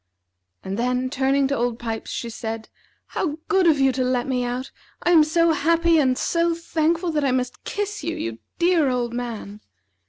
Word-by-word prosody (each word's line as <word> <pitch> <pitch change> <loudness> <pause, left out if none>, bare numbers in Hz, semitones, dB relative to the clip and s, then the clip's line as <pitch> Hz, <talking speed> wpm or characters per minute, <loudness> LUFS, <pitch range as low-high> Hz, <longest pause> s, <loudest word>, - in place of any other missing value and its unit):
And 195 +3 -4
then, 250 +1 0
turning 275 0 +2
to 280 - +1
Old 240 -1 -1
Pipes, 225 -2 -5
she 235 - -4
said: 225 -1 -5 0.4
"How 305 -4 -2
good 380 -3 +3
of 305 -4 +4
you 270 -1 +4
to 255 0 -1
let 250 -1 0
me 250 -2 0
out! 245 +2 -3 0.3
I 350 - +3
am 325 -3 +7
so 335 +2 +3
happy 335 +1 +3
and 260 -3 +2
so 335 0 +1
thankful, 335 +1 0
that 300 -2 0
I 275 - +2
must 250 -1 -2
kiss 415 -3 -3
you, 330 +2 -2
you 115 0 -4 0.2
dear 340 -5 +3
old 245 -2 -1
man!" 225 -4 -5
270 Hz, 190 wpm, -23 LUFS, 245-335 Hz, 0.4 s, am